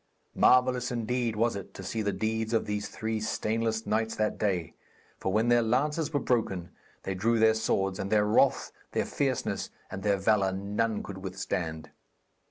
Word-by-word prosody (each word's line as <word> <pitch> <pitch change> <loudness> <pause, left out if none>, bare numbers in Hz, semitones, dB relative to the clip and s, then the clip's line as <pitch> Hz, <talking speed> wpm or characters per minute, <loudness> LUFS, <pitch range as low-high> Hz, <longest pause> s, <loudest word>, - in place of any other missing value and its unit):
Marvellous 125 -1 +4
indeed 120 -1 -1
was 115 +1 +1
it 100 -2 -8
to 95 - -7
see 110 +4 -2
the 100 -1 0
deeds 110 +3 -2
of 115 - +2
those 105 0 -2
three 110 0 -3
stainless 110 +1 -1
knights 110 +1 0
that 110 -1 -1
day; 90 -6 -1 0.5
for 95 - -1
when 110 +4 +2
their 120 0 +5
lances 145 +7 0
were 145 - +1
broken, 100 -10 -1 0.3
they 95 - -2
drew 115 +5 +1
their 110 0 +5
swords, 95 -3 0
and 100 0 -3
their 105 -1 +4
wrath, 105 - +3 0.2
their - - +1
fierceness - - -1 0.2
and 95 - -5
their 100 -1 +2
valour, 95 -1 +2
none 105 +3 -1
could 95 -1 -7
withstand. 90 -4 -4
110 Hz, 175 wpm, -29 LUFS, 100-115 Hz, 0.5 s, their